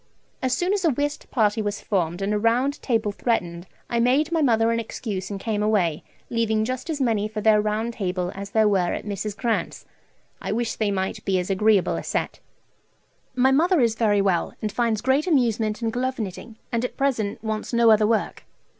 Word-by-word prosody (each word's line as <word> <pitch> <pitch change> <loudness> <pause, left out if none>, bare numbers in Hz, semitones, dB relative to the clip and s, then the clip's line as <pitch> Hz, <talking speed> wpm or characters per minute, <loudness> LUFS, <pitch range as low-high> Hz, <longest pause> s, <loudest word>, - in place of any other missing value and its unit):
As 255 -1 0
soon 360 +3 +1
as 405 -2 -1
a 330 - +4
whist 290 +2 -2
party 220 -3 +1
was 205 -1 -3
formed, 175 -2 -1
and 205 +2 0
a 210 - +1
round 245 +6 +1
table 225 -5 0
threatened, 180 -6 -2 0.2
I 235 - -1
made 270 +7 +2
my 330 -1 +1
mother 230 -4 +3
an 230 - 0
excuse 205 -4 -5
and 200 -1 -5
came 210 0 -2
away, 190 -7 +1 0.3
leaving 220 -2 +1
just 255 +5 -4
as 310 -3 -2
many 225 -5 +1
for 215 0 -5
their 215 0 +4
round 215 +2 -1
table 180 -4 -2
as 200 +1 -7
there 220 +1 +3
were 190 -4 +1
at - - -6
Mrs. 205 0 -4
Grant's. 225 +2 -2 0.6
I - - -2
wish 230 0 -1
they 215 -2 0
might 190 -1 -2
be 190 -1 +1
as 180 +2 -2
agreeable 205 0 +3
a - - -5
set. - - -3 1.0
My 260 +1 +4
mother 335 +5 +3
is 230 -3 +3
very 215 -3 +2
well, 185 -4 0
and 215 - -3
finds 225 -1 0
great 270 +6 +1
amusement 230 - +1
in 225 - 0
glove 260 +2 -2
knitting, 215 +2 -6
and 235 -1 0
at 250 - -4
present 235 -7 -1
wants 215 -1 -3
no 235 -1 +5
other 215 -1 +4
work. 225 -1 -1
220 Hz, 205 wpm, -24 LUFS, 205-245 Hz, 1.0 s, no